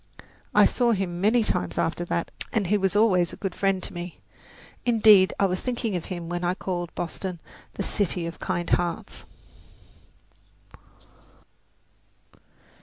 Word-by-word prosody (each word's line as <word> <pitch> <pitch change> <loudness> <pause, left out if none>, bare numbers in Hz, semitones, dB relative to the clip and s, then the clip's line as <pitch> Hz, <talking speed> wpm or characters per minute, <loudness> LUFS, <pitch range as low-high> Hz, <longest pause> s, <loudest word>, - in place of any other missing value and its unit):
I - - +7
saw 240 -2 +2
him 180 -3 -2
many 220 +4 +4
times 90 - -1
after 175 +1 0
that, 170 -1 -2 0.2
and 210 -3 0
he 200 +4 +2
was 195 -1 +1
always 185 -5 +3
a - - -9
good 195 -3 -3
friend 195 -1 0
to - - -4
me; 175 0 -7 0.6
indeed, 215 -5 +6
I 200 - +4
was 185 -1 -1
thinking 240 -5 -2
of 175 - -3
him 175 -2 -6
when 175 +1 -3
I 175 +1 +1
called 175 -3 -4
Boston 175 +1 -4 0.4
"the - - -2
City 180 -4 -1
of 170 0 -6
Kind 175 -2 -2
Hearts." 175 -1 -1
185 Hz, 145 wpm, -25 LUFS, 175-205 Hz, 0.6 s, I